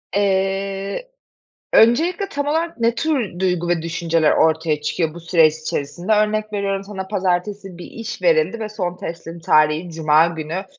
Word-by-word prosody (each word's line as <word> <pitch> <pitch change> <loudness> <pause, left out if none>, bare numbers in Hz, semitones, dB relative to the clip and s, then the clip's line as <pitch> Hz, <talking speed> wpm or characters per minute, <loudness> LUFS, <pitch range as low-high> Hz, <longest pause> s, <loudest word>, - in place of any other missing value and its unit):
Eee, 195 - -1 0.7
öncelikle 340 - +4
tam 285 -3 -3
olarak 325 +1 -1
ne 230 0 +2
tür 245 - -1
duygu 180 -2 0
ve 170 -2 +1
düşünceler 165 -1 +1
ortaya 160 -1 +2
çıkıyor 160 0 -1
bu 170 - -9
süreç 165 -2 +3
içerisinde? 160 +5 -4
Örnek 215 0 0
veriyorum, 195 -1 -1
sana 190 -2 -7
pazartesi 190 -1 -2
bir 175 - -9
iş 230 0 -7
verildi 475 - +2
ve 215 -1 -4
son 180 -4 -4
teslim 170 0 -7
tarihi, 155 +1 +2
cuma 160 0 +3
günü. 165 +3 -5
190 Hz, 150 wpm, -20 LUFS, 165-215 Hz, 0.7 s, öncelikle